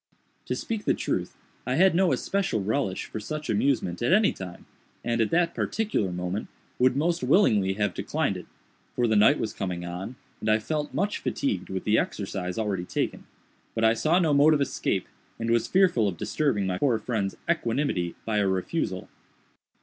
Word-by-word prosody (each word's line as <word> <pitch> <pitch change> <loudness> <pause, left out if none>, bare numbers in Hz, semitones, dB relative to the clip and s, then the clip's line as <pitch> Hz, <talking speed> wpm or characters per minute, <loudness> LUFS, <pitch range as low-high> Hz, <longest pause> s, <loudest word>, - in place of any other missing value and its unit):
To - - -1
speak 220 -2 -4
the - - +3
truth, - - -2 0.3
I 125 +1 -1
had 185 +4 +5
no 180 +1 +3
especial 195 - 0
relish 105 -2 -1
for - - -6
such 150 +7 -4
amusement 105 -6 0
at 120 - +2
any 210 +1 +4
time, 90 -2 -9 0.4
and, 120 -1 +1
at 110 - +2
that 170 0 +2
particular 210 - -1
moment, 90 +3 -3 0.3
would 130 0 +4
most 170 +4 +1
willingly 105 - +3
have 105 -2 -1
declined - - -1
it; - - -8 0.5
for 120 - +2
the 110 -2 +2
night 110 +8 +6
was 110 - -3
coming 90 -2 -4
on, 90 +8 -6 0.2
and 110 - -2
I 110 - +5
felt 150 +6 -3
much 205 +2 0
fatigued 275 -2 -2
with 95 -1 -3
the 110 +1 +3
exercise 95 -3 -3
already 105 -5 -1
taken; - - -3 0.5
but 110 - 0
I 110 0 +6
saw 155 +9 +2
no 165 -5 +3
mode 150 +2 +6
of 145 - 0
escape, 140 - -1 0.3
and 115 0 -2
was 115 0 +2
fearful 180 - +3
of 90 -4 -3
disturbing 130 - 0
my 90 -1 -1
poor 130 -6 +3
friend's 105 -3 -2
equanimity 120 - 0
by 110 -2 0
a 100 - +2
refusal. 95 - -2
115 Hz, 185 wpm, -26 LUFS, 95-155 Hz, 0.5 s, night